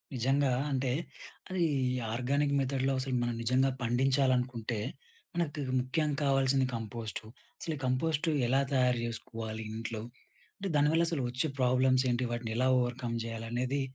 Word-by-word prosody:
నిజంగా 135 +3 +2 0.2
అంటే 130 -1 0 0.6
అది 185 -2 0 0.5
ఆర్గానిక్ 140 +4 +1
మెథడ్‌లో 135 0 +1
అసలు 130 0 -1
మనం 120 0 0
నిజంగా 130 +3 +3
పండించాలనుకుంటే 125 -2 +1 0.5
మనకు 170 -3 0
తగు 135 -3 -2
ముఖ్యం 150 +5 0
కావాల్సింది 135 -1 +3
కంపోస్ట్. 115 0 -4 0.4
అసలు 165 - -3
ఈ - - -10
కంపోస్ట్ 150 +5 +1 0.2
ఎలా 135 +3 +3
తయారు 125 -2 +3
జేసుకోవాలి 110 -1 -5
ఇంట్లో? 115 -1 -4 0.6
అంటే 195 -1 -3
దానివల్ల 150 +3 +4
అసలు 165 -5 -1
వచ్చే 130 +5 0
ప్రాబ్లమ్స్ 130 +1 +4
ఏంటి? 120 +1 0
వాటిని 120 -1 -3
ఎలా 130 +1 +3
ఓవర్‌కమ్ 120 -1 -1
జేయాలనేది 120 +4 -2
130 Hz, 135 wpm, -31 LUFS, 120-140 Hz, 0.6 s, దానివల్ల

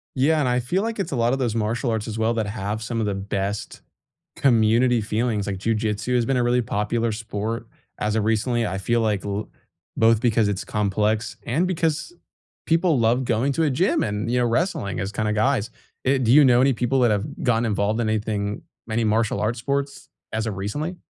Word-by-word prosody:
Yeah, 150 +4 +3
and 130 - +1
I 125 0 +1
feel 175 - -1
like 225 -1 -3
it's 175 -6 -3
a - - 0
lot 120 +1 +2
of 135 - 0
those 120 -4 -1
martial 115 +3 -1
arts 110 -1 -2
as 110 0 -5
well 110 +1 +1
that 110 -2 -1
have 105 +1 -4
some 115 0 -3
of 110 - 0
the 100 - -1
best 100 +1 -4 0.6
community 120 -1 +3
feelings, 110 -1 -1
like, 100 -1 -2
Jiu 115 +4 0
Jitsu 110 +3 -1
has 120 -1 +2
been 135 +2 +1
a 125 - +2
really 120 +1 +2
popular 115 +1 -1
sport 110 +1 -4 0.3
as 105 0 -1
of 110 - +1
recently, 115 +2 +1
I 95 -2 -2
feel 115 +4 +1
like 105 -3 0
l 100 +1 -3 0.5
both 115 -1 +4
because 115 -3 +2
it's 100 -1 -2
complex 105 +2 -1
and 155 +10 +1
because 170 - -1 0.5
people 165 -1 +2
love 120 +2 +2
going 120 +4 +1
to 165 - +1
a 150 - +2
gym 170 +9 +1
and, 105 +2 -2
you 125 - +2
know, 120 - +2
wrestling 125 - -1
as 100 0 -3
kinda 105 0 -1
guys. 110 0 +1 0.4
Eh, 135 +1 +3
do 120 -3 +1
you 150 +1 +8
know 125 -2 +5
any 135 +1 +4
people 125 +2 0
that 120 -3 +4
have 105 +1 0 0.2
gotten 120 -1 +2
involved 105 +1 0
in 110 - 0
anything 105 -1 -2 0.2
many 115 +1 0
martial 110 -1 +1
arts 110 +3 -1
sports 140 +2 -3 0.2
as 110 0 -2
of 105 -4 -4
recently? 145 - -3
115 Hz, 215 wpm, -23 LUFS, 105-125 Hz, 0.6 s, you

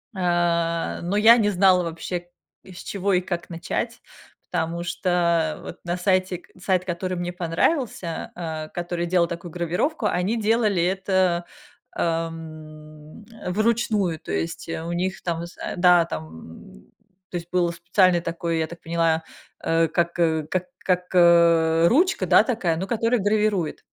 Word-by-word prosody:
Э, 170 -2 0
но 180 +4 -1
я 225 +3 +7
не 210 -3 +2
знала 185 -2 +4
вообще, 175 +1 -5 0.4
с 185 -2 -11
чего 200 0 -1
и 180 - +3
как 175 -1 -5
начать, 165 -1 -4 0.5
потому 170 +1 -2
что 170 -2 0
вот - - -9
на 175 +1 -2
сайте 185 0 +1
к - - -23
сайт, 185 -1 +1
который 185 +1 -3
мне 175 0 -3
понравился, 175 - -1
а, 160 -2 -5
который 175 0 -3
делал 175 0 +2
такую 170 0 -7
гравировку, 180 - -1
они 195 +3 0
делали 215 -4 +2
это, 185 -1 +1 0.5
ам, 155 0 -5
э, 225 -5 -7
вручную. 215 -4 +1
То - - -8
есть, 80 +1 -3
у 165 +1 -4
них 185 +2 -2
там 170 -1 -2
з 170 - -13 0.2
Да, 175 -1 +5
там 80 - -10 0.5
То 180 - -3
есть, 170 0 -8
был 175 -1 +2
специальный 175 +1 +2
такой, 170 0 -2
я 160 - 0
так 170 +1 -11
поняла, 165 -1 0 0.4
э, 165 0 +2
как, 170 +2 -1
э 160 -2 +2
как 185 -1 -1 0.2
как, 180 -1 +1
э, 170 -2 +5
ручка, 345 - +2
да, - - +6
такая, 205 -10 0
ну, 185 +4 -4
которая 230 +1 +1
гравирует. 205 -4 0
175 Hz, 150 wpm, -23 LUFS, 165-185 Hz, 0.5 s, я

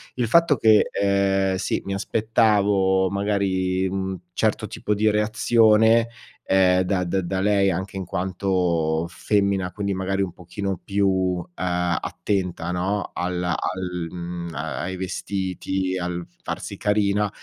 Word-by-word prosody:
Il 125 -2 0
fatto 165 +5 +4
che, 110 -1 +4
ehm, 95 -1 +1
sì, - - -1
mi 100 - -3
aspettavo, 100 -2 +2
magari, 95 -2 0
mhmm, 95 0 -3 0.2
certo - - 0
tipo 105 - -2
di 105 +1 +2
reazione, 110 +1 +4 0.4
ehm, 95 -1 +4
da 90 0 0
da 95 +2 -1
da 95 +2 -2
lei 100 -1 +3
anche 95 +3 -4
in 95 - -4
quanto 90 -3 0
femmina, 100 0 0
quindi, 100 0 -2
magari, 95 +1 -1
un 95 -3 -1
pochino 95 +2 -4
più, 95 -3 +1
ehm, 90 -1 0
attenta, 90 -4 -2
no, 95 +3 -2
alla 90 -1 -1
al, 90 -2 -3
mhmm, 85 -1 -6
a 75 +2 -4
ai 95 +1 -3
vestiti, 95 0 -3
al 90 -1 -3 0.2
farsi - - -5
carina, 105 0 +1
95 Hz, 135 wpm, -23 LUFS, 90-100 Hz, 0.4 s, fatto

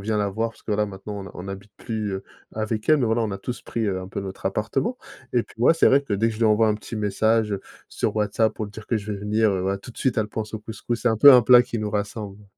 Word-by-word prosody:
vient 105 +2 -1
la 105 -1 +1
voir, 115 +3 -1
parce - - -22
que 105 - -2
là, 105 +1 +2
maintenant 100 0 -7
on - - -6
ne 95 - -9
on - - -8
n'habite 100 +1 -8
plus, 110 -2 -4
heu, 95 - -6 0.3
avec 110 +2 -3
elle, 150 -5 +5
voilà, 115 +1 +1
on 110 - -1
a 100 - -4
tous 120 +4 -6
pris, 115 -2 -2
heu, 95 -2 -1
un 95 - -8
peu 100 - -4
notre 95 0 -6
appartement 210 - -1 0.3
et 120 -2 +2
puis - - -19
moi 125 - +6
c'est 165 - +3
vrai 140 +1 +5
que 140 - -6
dès 105 +3 +2
que 115 - 0
je - - -9
lui 115 - +2
envoie 110 +1 +4
un 105 - +2
petit 110 +1 -7
message 105 +1 +1 0.3
sur - - -2
WhatsApp 105 +1 +1
pour 110 - -4
lui 105 - -10
dire 105 0 -11
que 120 - +1
je 105 0 -4
vais 100 - -5
venir, 105 +1 +1
heu, 95 - -1
voilà, 95 +1 -1
tout 120 - -11
de - - -14
suite 130 -4 0
elle 110 - +1
pense 110 0 -5
au 110 - -3
couscous. 110 +2 -5
C'est 120 - +2
un 110 - +1
peu 140 +6 +9
un 125 -2 +7
plat 125 +1 +7
qui 120 -1 -5
nous 105 -1 -3
rassemble. 105 0 -4
110 Hz, 310 wpm, -24 LUFS, 100-115 Hz, 0.3 s, peu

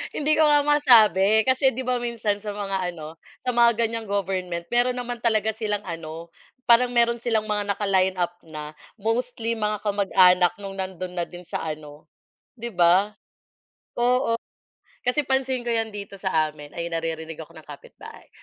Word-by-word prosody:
Hindi 305 +1 +2
ko - - +6
nga 295 -1 +5
masabi, 220 - +5
kasi 265 +1 +3
'di 260 - -3
ba 250 -1 0
minsan 225 -4 -2
sa 205 -1 -6
mga 195 -3 -2
ano, 160 0 -10 0.3
sa 250 - 0
mga 235 -1 +4
ganyang 225 -1 -4
government 185 -3 -2
meron 245 +1 +2
naman 245 -1 -5
talaga 220 -2 +1
silang 210 -1 -3
ano, 165 -1 -8 0.4
parang 245 +1 +5
meron 235 0 +2
silang 225 -2 -1
mga 210 -1 0
naka 205 +1 -3
line 190 -1 +2
up 175 -1 -2
na. 150 -1 -8 0.2
Mostly 230 +1 -2
mga 210 -1 -2
kamag-anak 190 -3 +4
nung 195 -1 -7
nandun 185 -1 -5
na 175 - 0
din 175 0 -11
sa - - -5
ano, 150 -1 -8 0.5
'di 235 +1 -5
ba? 185 +5 +3 0.8
Oo, 245 -1 +2 0.7
kasi 270 +4 +1
pansin 265 -1 0
ko 240 - -4
'yan 225 -2 -1
dito 200 -1 -8
sa 160 -5 +1
amin- 150 -1 -13
ay 170 0 -4
naririnig 165 -1 -4
ako 165 +1 -11
ng 160 - -12
kapitbahay 145 -1 -13
205 Hz, 170 wpm, -24 LUFS, 175-235 Hz, 0.8 s, ko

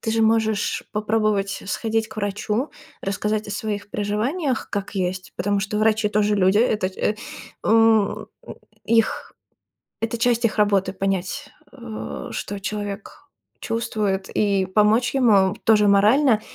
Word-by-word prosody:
Ты 225 - -2
же 225 - +2
можешь 220 -2 +1
попробовать 210 -2 0
сходить 225 +2 -1
к - - -13
врачу, 210 +5 -2 0.3
рассказать 210 +2 -2
о - - -5
своих 205 -1 -4
переживаниях, 235 - -2
как 200 0 -4
есть, 185 -1 -3
потому 200 +3 0
что 210 +1 -2
врачи 215 0 +2
тоже 210 0 +1
люди. 190 +1 +3
Этот 210 -5 +1
э, 210 - 0 0.5
м, 225 -2 +3 0.6
их 225 -1 +1 0.7
Это 225 +1 -2
часть 235 0 +1
их 220 - -3
работы: 200 -3 +2
понять, 195 +9 -2 0.2
э, 235 -5 -7
что 205 - -5
человек 205 0 -6 0.4
чувствует 215 -4 -2
и 200 -2 +1
помочь 215 +6 +2
ему 205 -7 +4
тоже 210 -2 +5
морально. 215 +4 +4
210 Hz, 130 wpm, -22 LUFS, 200-225 Hz, 0.7 s, тоже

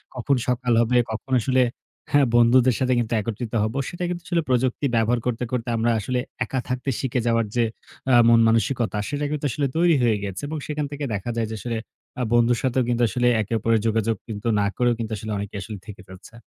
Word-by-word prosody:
কখন 130 +3 +1
সকাল 125 -1 +1
হবে, 125 +2 +2
কখন 120 +4 -6
আসলে 130 +3 +2 0.5
হ্যাঁ 145 -1 +5
বন্ধুদের 120 +1 +5
সাথে 130 -1 +2
কিন্তু 115 0 -2
একত্রিত 115 +2 -5
হব। 110 +2 -2 0.2
সেটা 175 0 -6
কিন্তু 175 -1 -4
আসলে 170 -2 +1
প্রযুক্তি 130 +2 +1
ব্যবহার 115 +2 +2
করতে, 125 0 -1
করতে 120 -1 -2
আমরা 115 +1 +2
আসলে 125 +4 -2 0.3
একা 130 - -2
থাকতে 130 +2 -2
শিখে 130 -1 -1
যাওয়ার 115 -1 +2
যে 120 - +3 0.4
অ্যা 125 -2 +5
মন-মানসিকতা 115 0 +3
সেটা 145 0 -2
কিন্তু 150 -1 -3
আসলে 140 +3 0
তৈরি 170 -2 +4
হয়ে 110 -3 +3
গেছে। 95 -2 -5
এবং 155 +1 -4
সেখান 150 -1 -2
থেকে 145 0 -5
দেখা 100 +4 -3
যায় 115 -2 -1
যে - - -3
আসলে 115 0 -3 0.4
আ - - +1
বন্ধুর 120 0 +4
সাথেও 130 0 +1
কিন্তু 120 0 0
আসলে 125 +4 +1
একে 105 +3 -4
অপরের 115 +1 +2
যোগাযোগ 110 0 +1
কিন্তু 110 0 -5
না 100 - +2
করেও 120 -1 +3
কিন্তু 110 -1 -4
আসলে 110 +1 -6
অনেকে 100 +1 -6
আসলে 105 +1 -7
থেকে 100 -2 -9
ফেলছে। 95 +5 -13
120 Hz, 210 wpm, -23 LUFS, 115-130 Hz, 0.5 s, হ্যাঁ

